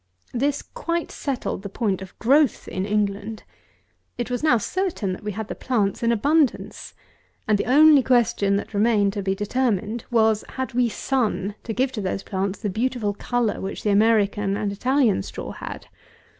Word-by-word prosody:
216. 240 - -3
This 285 +2 +1
quite 340 -9 -3
settled 270 -8 -3
the 200 - -6
point 195 -2 -1
of 190 - -10
growth 275 +2 +3
in 185 +1 -3
England. 210 +1 -1 0.7
It 240 0 -3
was 245 - -1
now 305 -6 +4
certain 280 - -2
that 185 - -9
we 210 - -3
had 215 +1 -5
the - - -4
plants 210 -7 -1
in 230 0 +2
abundance; 285 +5 0 0.5
and 215 - +4
the 205 - -1
only 295 +2 +7
question 235 -6 +2
that 200 - -3
remained 205 -1 +2
to 205 - -3
be 190 0 -1
determined 215 +1 -1
was, 220 -2 +3
Had 260 -1 -3
we 245 0 +2
SUN 215 -5 -1
to 230 - -4
give 255 +4 0
to 230 -5 -4
those 195 0 -3
plants 195 0 -2
the 210 - -3
beautiful 225 -1 -1
colour 240 +2 -1
which 195 - -5
the 210 - +2
American 205 -1 +2
and 205 -1 -1
Italian 250 - +2
straw - - -7
had? - - -8
220 Hz, 180 wpm, -23 LUFS, 200-255 Hz, 0.7 s, only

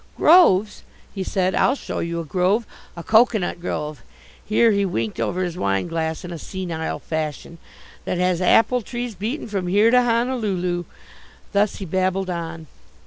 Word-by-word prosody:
"Groves!" 215 - +5 0.3
he 195 - -3
said. 185 0 0
"I'll 265 - +3
show - - -5
you 170 0 -3
a 165 - -5
grove, 190 +8 +1 0.3
a 170 - -6
coconut 220 -5 +2
grove" 150 -6 -4 0.4
here 225 +2 +3
he 200 -1 +1
winked 115 - -2
over 115 - -1
his 175 -1 -4
wineglass 160 - -1
in 175 - -7
a 170 - -6
senile 170 -4 -4
fashion 160 +1 -5 0.5
"that - - -2
has 180 0 +1
apple 230 +6 +4
trees 240 +1 -5
beaten 220 - -4
from 195 -4 -3
here 205 +5 +4
to 250 0 +6
Honolulu." 220 -8 0 0.7
Thus 205 0 +1
he 195 - -6
babbled 185 +1 -1
on. 165 -1 -5
185 Hz, 155 wpm, -22 LUFS, 170-215 Hz, 0.7 s, to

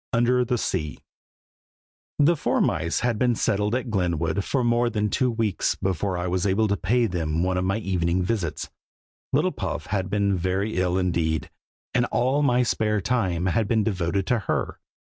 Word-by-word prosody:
UNDER 125 +1 +3
THE 125 0 0
SEA. 80 -9 -2 1.2
THE 155 +4 +4
four - - 0
mice 80 +1 0
had 120 -3 0
been 125 -2 +2
settled 105 +1 0
at 125 -2 -3
Glenwood 90 -1 0
for 130 +3 0
more 120 0 +2
than 105 -2 -1
two 130 - +1
weeks 110 -4 0
before 95 0 -2
I 90 - -2
was 90 +1 0
able 105 +3 +2
to 100 - +2
pay 115 +6 +1
them 85 -4 -1
one 95 0 0
of 90 0 0
my 100 +3 +1
evening 90 -4 0
visits. 90 -6 -2 0.6
Little - - +2
Puff - - -4
had 95 -2 -2
been 100 -1 +1
very 95 +4 -1
ill 90 0 +1
indeed, 85 -4 -1 0.4
and 120 -1 +2
all 130 +5 +1
my 125 -3 +3
spare 105 -3 0
time 95 -5 0
had 105 +3 +1
been 110 -1 +2
devoted 95 -2 -1
to 120 +4 +1
her. - - -1
100 Hz, 180 wpm, -24 LUFS, 90-120 Hz, 1.2 s, THE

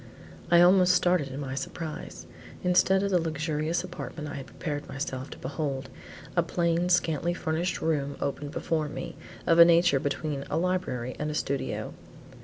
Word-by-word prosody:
I 170 0 +7
almost 180 0 +6
started 175 -4 +2
in 135 +1 -6
my 135 -2 -4
surprise. 155 +3 -6 0.4
Instead 190 +2 +4
of 200 - 0
the 180 -2 +3
luxurious 160 +1 -1
apartment 170 -4 -6
I - - -6
had 135 -2 -6
prepared 145 +3 -5
myself 135 -1 -4
to - - -9
behold, 135 -1 -4 0.4
a 175 - +5
plain, 170 +1 0
scantily 175 -1 +2
furnished 170 +2 -2
room 145 -3 0
opened 140 +1 -3
before 155 0 -1
me, - - -6 0.3
of 165 0 +4
a - - +13
nature 170 -4 +5
between 145 +1 -2
a 155 - 0
library 165 -9 -1
and 150 - -1
a 150 - -3
studio. 140 -2 -2
160 Hz, 165 wpm, -28 LUFS, 140-175 Hz, 0.4 s, a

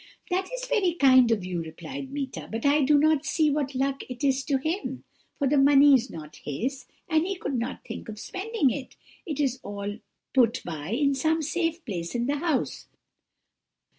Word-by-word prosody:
"'That 375 +1 0
is - - -4
very 415 -9 +1
kind 260 -5 +6
of 215 -5 +1
you,' 180 -2 -2
replied 265 - -7
Meeta, 275 -2 -5
'but 225 +3 -3
I 290 +1 +4
do 290 +2 +5
not 310 0 +3
see 310 -1 +2
what 280 -2 -1
luck 275 +1 0
it 250 +3 -7
is 270 -1 +2
to 275 - +2
him, 270 -3 -3 0.3
for 280 - +1
the 285 +1 +3
money 280 +1 +7
is 255 -1 +3
not 150 -2 -9
his, 255 - -4 0.2
and 315 0 +2
he 390 - -2
could 320 - -4
not 245 +1 -3
think - - -7
of 215 - -7
spending 385 - 0
it: 265 +2 -6 0.3
it 300 -3 -3
is 265 -3 0
all 205 +1 -5 0.3
put 240 -4 +3
by 160 -2 -5
in 280 +5 +2
some 315 +4 +1
safe 330 +2 -1
place 175 -4 -4
in 240 0 0
the 285 +3 0
house.' 310 -3 -1
275 Hz, 195 wpm, -26 LUFS, 240-310 Hz, 0.3 s, money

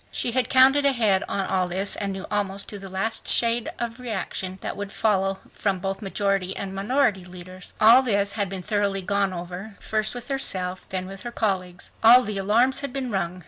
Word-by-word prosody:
She 240 - -1
had 250 0 0
counted 265 +2 +5
ahead 225 -9 +3
on 195 -1 -2
all 185 -1 0
this 190 +3 0
and 200 -1 -3
knew 190 0 -6
almost 200 -1 -2
to 205 - -6
the 195 0 -9
last 210 +4 -2
shade 235 0 +3
the 235 - -2
reaction 195 -5 -4
that - - -4
would 200 -1 -6
follow 195 -3 +1
from 200 -2 -1
both 195 +2 -4
majority 195 -2 -1
and 195 -1 -5
minority 205 -1 +1
leaders. 180 0 -11
All 230 +4 +8
this 200 -5 +1
had 205 -3 -2
been 190 -1 -5
thoroughly 200 -2 -1
gone 200 0 0
over, 180 +4 -7
first 215 +1 -2
with 245 - -6
herself, 185 -9 -1
then 185 -1 -2
with 195 +1 -9
her 240 - -6
colleagues. 185 -6 -2
All 245 +3 +8
the 210 -3 -3
"alarms" 235 +8 +2
had 280 -2 -4
been 260 -2 -4
rung. 185 -2 -2
200 Hz, 200 wpm, -24 LUFS, 190-230 Hz, -, All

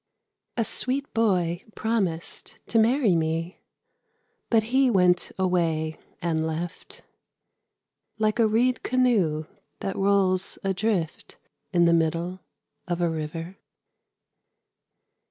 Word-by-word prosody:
A 230 - +1
sweet 270 +6 -1
boy 180 -6 +1
promised 195 -8 -2
to 230 - +3
marry 230 -3 +3
me, 165 +2 -1 0.9
But 225 -2 +4
he 265 0 +5
went 180 -5 +3
away 165 -4 0 0.2
and 160 -2 0
left 165 +2 -6 1.1
Like 215 +1 +1
a 225 - +5
reed 240 +4 +2
canoe 210 -12 +2 0.4
that 195 - -3
rolls 195 -1 +2
adrift 195 -3 -1 0.3
In 175 -1 +4
the 170 - +5
middle 170 +3 0 0.5
of 175 -1 -1
a 170 -1 +1
river. 165 +3 -5
185 Hz, 100 wpm, -26 LUFS, 165-220 Hz, 1.1 s, he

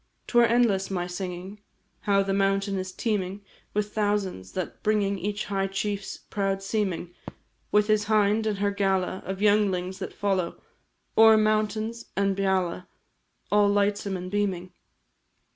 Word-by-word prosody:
'Twere 240 -1 +4
endless 225 -5 +2
my 180 -2 -2
singing 180 +2 -6 0.5
How 195 0 +4
the 195 0 -1
mountain 195 0 +1
is 185 0 -4
teeming 200 -1 -2 0.3
With 210 0 -1
thousands, 205 - -1
that 185 - -5
bringing 205 -2 +1
Each 205 +3 -3
a - - -11
high 195 -1 0
chief's 200 +1 -3
proud 195 -1 -2
seeming, 190 -4 -2 0.6
With 210 0 +4
his 215 -1 +2
hind, 215 0 +2
and 210 -2 -1
her 200 0 +1
gala 195 -2 0
Of 190 +1 -3
younglings, 190 -3 +2
that - - -5
follow 190 -4 -1 0.6
O'er 220 0 +8
mountain 215 +1 +1 0.2
and 195 -1 +2
beala, 185 -2 0 0.6
All 205 0 +5
lightsome 200 -1 +1
are 180 0 -6
beaming. 185 -2 -2
200 Hz, 145 wpm, -26 LUFS, 190-210 Hz, 0.6 s, O'er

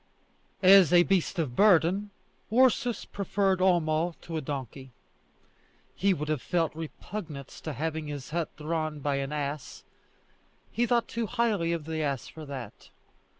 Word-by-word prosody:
As 185 -3 +8
a 175 -1 +7
beast 190 0 0
of 145 -8 -2
burden, 195 +1 +4 0.4
Ursus 245 -1 +3
preferred 195 -1 0
Homo 170 -2 +2
to 165 - -6
a 160 - -1
donkey. 135 -1 -6 1.0
He 200 +1 +2
would 150 -4 -2
have 155 -4 -1
felt 165 -3 0
repugnance 160 -2 -7
to 155 - -5
having 155 +1 -3
his 145 -1 -6
hut 165 -1 -1
drawn 155 -1 -3
by 140 0 0
an 135 +1 -3
ass; 145 -1 -4 0.9
he 240 +1 +1
thought 235 -1 +2
too 230 -1 -3
highly 215 -8 0
of 165 -3 -3
the 160 0 -3
ass 140 -4 -2
for 155 -2 -10
that. 130 -6 -8
160 Hz, 150 wpm, -28 LUFS, 150-195 Hz, 1.0 s, As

